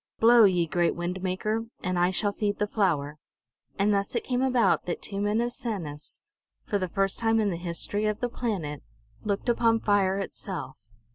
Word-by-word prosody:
Blow, 230 Hz, 0 st, +7 dB
ye 180 Hz, -3 st, +3 dB
great 170 Hz, +1 st, +1 dB
wind 175 Hz, +2 st, -3 dB
maker, 215 Hz, +5 st, -1 dB, 0.2 s
and 185 Hz, -1 st, 0 dB
I 175 Hz, +1 st, +4 dB
shall 205 Hz, +2 st, 0 dB
feed 205 Hz, 0 st, -1 dB
the 210 Hz, -, +1 dB
flower!" 155 Hz, -9 st, 0 dB, 0.6 s
And 205 Hz, +1 st, +3 dB
thus 200 Hz, +3 st, -1 dB
it 235 Hz, -, 0 dB
came 250 Hz, -1 st, -1 dB
about 255 Hz, -3 st, +2 dB
that 175 Hz, -, -3 dB
two 200 Hz, -1 st, -4 dB
men 205 Hz, +2 st, +1 dB
of 240 Hz, 0 st, -2 dB
Sanus, 170 Hz, -13 st, -5 dB, 0.4 s
for 205 Hz, -, 0 dB
the 185 Hz, -1 st, -2 dB
first 195 Hz, +1 st, 0 dB
time 225 Hz, -1 st, +2 dB
in 210 Hz, -2 st, +1 dB
the -, -, -2 dB
history 175 Hz, +5 st, -2 dB
of 210 Hz, 0 st, -1 dB
the 245 Hz, -, 0 dB
planet, 195 Hz, -, -3 dB, 0.4 s
looked 205 Hz, 0 st, -2 dB
upon 230 Hz, -1 st, +3 dB
fire 200 Hz, -3 st, +2 dB
itself. 190 Hz, -6 st, -5 dB
200 Hz, 190 wpm, -27 LUFS, 180-225 Hz, 0.6 s, Blow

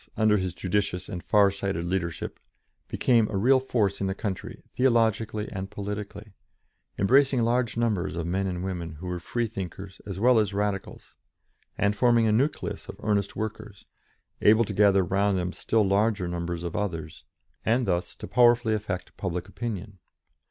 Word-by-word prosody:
under 110 Hz, -1 st, +4 dB
his 95 Hz, -3 st, -3 dB
judicious 95 Hz, 0 st, -1 dB
and 90 Hz, -4 st, -6 dB
far 100 Hz, -2 st, +4 dB
sighted 95 Hz, -3 st, -3 dB
leadership, 85 Hz, -2 st, -3 dB, 0.5 s
became 115 Hz, -4 st, +2 dB
a 100 Hz, -, -2 dB
real 130 Hz, +7 st, +5 dB
force 110 Hz, -7 st, 0 dB
in 100 Hz, -, 0 dB
the 95 Hz, -, -2 dB
country, 100 Hz, -3 st, -5 dB
theologically 115 Hz, -4 st, +1 dB
and 95 Hz, 0 st, -5 dB
politically, 105 Hz, 0 st, -6 dB, 0.6 s
embracing 130 Hz, +4 st, +4 dB
large 120 Hz, -1 st, +1 dB
numbers 105 Hz, -7 st, 0 dB
of 85 Hz, -1 st, -3 dB
men 95 Hz, +3 st, -1 dB
and 90 Hz, -1 st, -3 dB
women 85 Hz, -4 st, -4 dB
who 80 Hz, +4 st, -10 dB
were 90 Hz, -1 st, -3 dB
Freethinkers 95 Hz, -2 st, -5 dB
as 95 Hz, -2 st, -6 dB
well 120 Hz, +1 st, +5 dB
as 105 Hz, -2 st, 0 dB
Radicals, 100 Hz, -1 st, -3 dB, 0.6 s
and 100 Hz, 0 st, +1 dB
forming 120 Hz, 0 st, +4 dB
a 110 Hz, -, +3 dB
nucleus 135 Hz, +8 st, -1 dB
of -, -, -8 dB
earnest 100 Hz, -2 st, 0 dB
workers, 105 Hz, -2 st, -6 dB, 0.6 s
able 110 Hz, +2 st, +5 dB
to 105 Hz, -, -5 dB
gather 100 Hz, -1 st, +4 dB
round 100 Hz, +1 st, +1 dB
them 90 Hz, 0 st, -2 dB
still 110 Hz, -2 st, +1 dB
larger 100 Hz, -1 st, +1 dB
numbers 85 Hz, 0 st, -3 dB
of 85 Hz, -2 st, -4 dB
others, 80 Hz, -7 st, -4 dB, 0.4 s
and 120 Hz, +2 st, +2 dB
thus 90 Hz, -3 st, -1 dB
to -, -, -8 dB
powerfully 120 Hz, -1 st, +4 dB
affect 100 Hz, -4 st, -4 dB
public 90 Hz, -2 st, -3 dB
opinion. 105 Hz, -4 st, -6 dB
100 Hz, 160 wpm, -26 LUFS, 95-110 Hz, 0.6 s, real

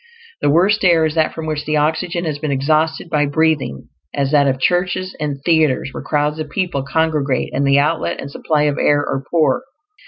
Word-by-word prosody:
The -, -, +2 dB
worst 190 Hz, +8 st, +3 dB
air 170 Hz, -3 st, +4 dB
is 155 Hz, -, -1 dB
that 160 Hz, -1 st, +1 dB
from 160 Hz, -, -7 dB
which 155 Hz, -1 st, -3 dB
the 155 Hz, 0 st, 0 dB
oxygen 170 Hz, +4 st, -1 dB
has 150 Hz, -2 st, -3 dB
been 155 Hz, -, -3 dB
exhausted 155 Hz, +5 st, 0 dB
by 150 Hz, -3 st, +1 dB
breathing; 150 Hz, -, 0 dB, 0.3 s
as 140 Hz, -1 st, 0 dB
that 145 Hz, -2 st, +4 dB
of 130 Hz, -1 st, 0 dB
churches 180 Hz, +4 st, 0 dB
and 145 Hz, -2 st, -3 dB
theaters 160 Hz, -6 st, +2 dB
where -, -, -7 dB
crowds 150 Hz, +1 st, -1 dB
of 155 Hz, -1 st, -5 dB
people 175 Hz, -3 st, -2 dB
congregate, 145 Hz, -2 st, -1 dB
and 140 Hz, +2 st, 0 dB
the 140 Hz, 0 st, +4 dB
outlet 85 Hz, -, 0 dB
and 140 Hz, -, -7 dB
supply 150 Hz, +1 st, 0 dB
of 145 Hz, -1 st, 0 dB
air 145 Hz, 0 st, +3 dB
are 135 Hz, -, -3 dB
poor. 165 Hz, +7 st, +2 dB
150 Hz, 205 wpm, -18 LUFS, 140-160 Hz, 0.3 s, air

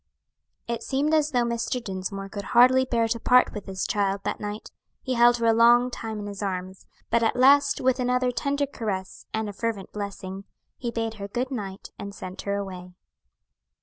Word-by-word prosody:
It 235 Hz, -1 st, -2 dB
seemed 285 Hz, +4 st, 0 dB
as 305 Hz, -1 st, +3 dB
though 245 Hz, -4 st, +2 dB
Mr. 235 Hz, +1 st, -1 dB
Dinsmore 195 Hz, -2 st, -5 dB
could 205 Hz, 0 st, -5 dB, 0.2 s
hardly 260 Hz, +2 st, +7 dB
bear 230 Hz, -3 st, +1 dB
to 230 Hz, +1 st, -1 dB
part 250 Hz, +2 st, +4 dB
with 210 Hz, -2 st, -7 dB
his 190 Hz, -1 st, -3 dB
child 200 Hz, -1 st, 0 dB
that -, -, -2 dB
night; 210 Hz, +1 st, -6 dB, 0.3 s
he 260 Hz, -, -1 dB
held 240 Hz, 0 st, +5 dB
her 230 Hz, -, -1 dB
a 225 Hz, -, +5 dB
long 240 Hz, +2 st, +5 dB
time 225 Hz, -2 st, -5 dB
in 205 Hz, -, -5 dB
his 205 Hz, 0 st, -6 dB
arms, 185 Hz, -1 st, -4 dB, 0.2 s
but 235 Hz, -, +3 dB
at 225 Hz, -, +2 dB
last, 280 Hz, +3 st, +5 dB
with 260 Hz, 0 st, +2 dB
another 250 Hz, 0 st, +1 dB
tender 280 Hz, +3 st, 0 dB
caress, 205 Hz, -8 st, -5 dB
and 220 Hz, 0 st, -2 dB
a 205 Hz, -, -5 dB
fervent 215 Hz, -2 st, -3 dB
blessing, 200 Hz, -1 st, -6 dB, 0.3 s
he 240 Hz, -, -4 dB
bade 225 Hz, -1 st, -2 dB
her 200 Hz, -, -4 dB
good 250 Hz, +6 st, -3 dB
night 200 Hz, -6 st, -6 dB
and 200 Hz, 0 st, -7 dB
sent 185 Hz, 0 st, -7 dB
her 200 Hz, 0 st, -2 dB
away. 180 Hz, -3 st, -6 dB
225 Hz, 195 wpm, -26 LUFS, 200-250 Hz, 0.3 s, hardly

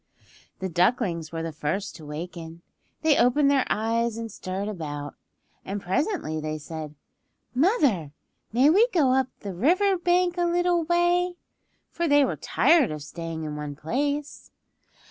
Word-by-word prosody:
The 190 Hz, -, -3 dB
ducklings 175 Hz, -2 st, +1 dB
were 165 Hz, -1 st, -4 dB
the 165 Hz, -, -3 dB
first 155 Hz, +6 st, -3 dB
to 155 Hz, -, -12 dB
waken. 165 Hz, +2 st, -7 dB, 0.4 s
They 315 Hz, -2 st, +4 dB
opened 275 Hz, +4 st, +4 dB
their 275 Hz, -2 st, +2 dB
eyes 230 Hz, +1 st, 0 dB
and 230 Hz, -1 st, -5 dB
stirred 190 Hz, +2 st, -4 dB
about, 145 Hz, -7 st, -5 dB, 0.5 s
and 200 Hz, +1 st, -4 dB
presently 190 Hz, -, -1 dB
they 155 Hz, 0 st, -3 dB
said, 155 Hz, 0 st, -7 dB, 0.6 s
"Mother, 255 Hz, -, +2 dB, 0.4 s
may 260 Hz, +7 st, +5 dB
we 425 Hz, +8 st, +5 dB
go 315 Hz, -, +2 dB
up 265 Hz, -1 st, +2 dB
the 200 Hz, -2 st, -5 dB
river 365 Hz, -, +2 dB
bank 355 Hz, 0 st, +2 dB
a 350 Hz, -, +2 dB
little 345 Hz, -1 st, +1 dB
way?" 350 Hz, +1 st, +2 dB, 0.6 s
For 340 Hz, -, -1 dB
they 290 Hz, -1 st, +5 dB
were -, -, -2 dB
tired 320 Hz, -9 st, +3 dB
of 150 Hz, -1 st, -5 dB
staying 165 Hz, +1 st, -6 dB
in 150 Hz, -1 st, -4 dB
one 150 Hz, -1 st, -5 dB
place. 285 Hz, -, -3 dB
225 Hz, 150 wpm, -26 LUFS, -, 0.6 s, may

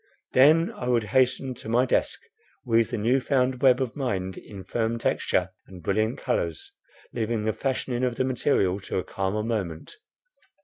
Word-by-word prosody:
Then 155 Hz, +6 st, +5 dB
I 125 Hz, -, -6 dB
would 120 Hz, -2 st, +2 dB
hasten 130 Hz, 0 st, +2 dB
to 110 Hz, -, -9 dB
my 120 Hz, +3 st, +3 dB
desk, -, -, 0 dB, 0.4 s
weave 115 Hz, -1 st, +2 dB
the 120 Hz, -, -3 dB
new 120 Hz, +5 st, +2 dB
found 130 Hz, -2 st, 0 dB
web 130 Hz, -1 st, +5 dB
of 130 Hz, -2 st, -2 dB
mind 95 Hz, -9 st, -2 dB
in 100 Hz, -2 st, -10 dB
firm 115 Hz, +4 st, -1 dB
texture 95 Hz, -5 st, 0 dB, 0.2 s
and 90 Hz, -3 st, -12 dB
brilliant 110 Hz, +6 st, 0 dB
colours, 85 Hz, -, -2 dB, 0.4 s
leaving 115 Hz, -1 st, -1 dB
the 110 Hz, 0 st, 0 dB
fashioning 130 Hz, -1 st, -2 dB
of 125 Hz, -2 st, 0 dB
the 130 Hz, -, 0 dB
material 115 Hz, -7 st, +1 dB
to 95 Hz, -, -4 dB
a 90 Hz, -, -1 dB
calmer 100 Hz, +2 st, -2 dB
moment. 100 Hz, -8 st, -3 dB
115 Hz, 170 wpm, -26 LUFS, 100-130 Hz, 0.4 s, Then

